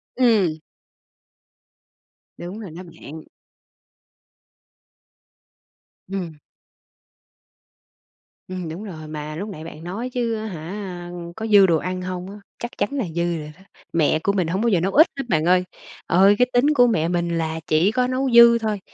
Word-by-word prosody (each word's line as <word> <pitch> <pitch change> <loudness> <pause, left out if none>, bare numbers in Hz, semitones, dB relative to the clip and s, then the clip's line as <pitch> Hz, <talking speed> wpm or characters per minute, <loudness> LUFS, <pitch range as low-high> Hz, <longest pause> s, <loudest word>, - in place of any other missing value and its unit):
Ừm. 210 -11 +3 1.8
Đúng 185 +5 -7
rồi 195 -7 -8
đó 175 +3 -9
bạn. 160 -3 -11 2.9
Ừm. 175 -6 -5 2.1
Ừm, 185 -3 -5
đúng 170 +6 -7
rồi, 160 -7 -8
mà 155 0 -6
lúc 200 +6 -5
nãy 160 -5 -8
bạn 160 -1 -10
nói 210 +9 -4
chứ 235 -2 -1
á 215 0 -5
hả, 180 0 -6 0.2
có 220 0 -4
dư 205 -3 +7
đồ 170 -3 +3
ăn 185 +2 -4
hông 180 0 -5
á? 200 - -9 0.2
Chắc 240 - -5
chắn - - 0
là 270 -7 -2
dư 170 -1 0
rồi 150 0 -7
đó. 185 - -21 0.3
Mẹ 155 -1 +2
của 200 - +1
mình 185 -4 0
hổng 185 +5 -1
bao 235 - +1
giờ 185 - +3
nấu 190 +4 0
ít 315 +4 +6
hết - - -1
bạn 160 -2 +1
ơi, 180 +1 +4 0.4
ờ, 195 +4 +5
cái 250 - +4
tính 285 +5 +4
của 245 -3 +5
mẹ 165 -8 +1
mình 170 -1 -1
là 160 0 -2
chỉ 165 +7 +3
có 250 0 +1
nấu 260 +1 -1
dư 235 0 +8
thôi. 215 -2 -2
185 Hz, 165 wpm, -22 LUFS, 165-220 Hz, 2.9 s, dư